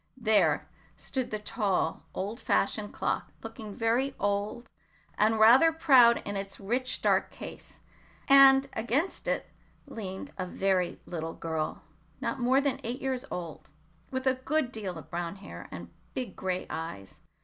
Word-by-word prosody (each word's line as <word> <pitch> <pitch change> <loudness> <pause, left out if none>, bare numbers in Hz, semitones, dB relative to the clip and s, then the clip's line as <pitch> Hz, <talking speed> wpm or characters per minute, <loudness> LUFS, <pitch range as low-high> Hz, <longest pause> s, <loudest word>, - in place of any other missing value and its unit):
There 205 - +3 0.3
stood 260 -2 -3
the 215 - -2
tall, 205 -6 -1
old 205 +5 -4
fashioned 205 -2 0
clock, - - -2
looking 225 -2 -8
very 245 +4 +1
old 205 +4 -1 0.5
and 220 +1 +2
rather 255 +9 +7
proud 265 -8 +5
in 205 - -4
its 195 0 -5
rich 245 +6 -2
dark - - +3
case, - - -10 0.5
and 275 0 +8
against 260 +11 -1
it - - 0 0.4
leaned 195 +5 -7
a 185 - -2
very 185 -1 0
little 165 -2 -5
girl, 160 -2 -3 0.4
not - - -2
more 255 +2 +3
than 280 -1 0
eight 240 +3 -3
years 265 -1 -2
old, 170 -3 -7 0.4
with 260 0 -3
a 260 - +4
good 300 -4 0
deal 200 -7 -5
of 160 - -12
brown 170 +1 -3
hair, 195 0 -10
and - - -8 0.2
big 250 -7 -4
gray 185 -1 -2
eyes. 100 -13 -7
220 Hz, 150 wpm, -29 LUFS, 190-260 Hz, 0.5 s, and